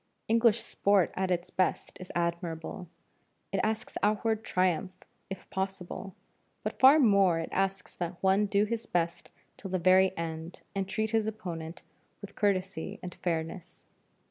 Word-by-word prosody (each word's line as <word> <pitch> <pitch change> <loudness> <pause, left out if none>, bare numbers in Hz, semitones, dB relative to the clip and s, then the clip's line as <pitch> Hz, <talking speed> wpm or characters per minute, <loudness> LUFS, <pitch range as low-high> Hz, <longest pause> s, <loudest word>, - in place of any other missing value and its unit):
English 230 0 +4
sport 200 -4 +2
at 190 0 -1
its 175 -1 -1
best 185 - 0
is 185 - -8
admirable; 170 +1 -3 0.6
it 195 - 0
asks 220 +3 -2
outward 215 +1 +1
triumph 185 0 0 0.4
if 195 -1 -7
possible, 190 0 -4 0.5
but - - -4
far 270 +3 +8
more 200 - +5
it 165 - -3
asks 195 0 -1
that 175 0 -4
one 195 +2 +4
do 200 0 +2
his 230 +1 -3
best 170 -1 -1 0.3
till 195 - -7
the 185 - 0
very 185 +2 +5
end 165 +1 -5
and 195 -1 -2
treat 220 +2 -1
his 220 -1 +1
opponent 175 -6 -6 0.4
with 200 -1 -10
courtesy 190 -4 -1
and 180 -1 -6
fairness. 165 0 -4
190 Hz, 145 wpm, -30 LUFS, 175-210 Hz, 0.6 s, far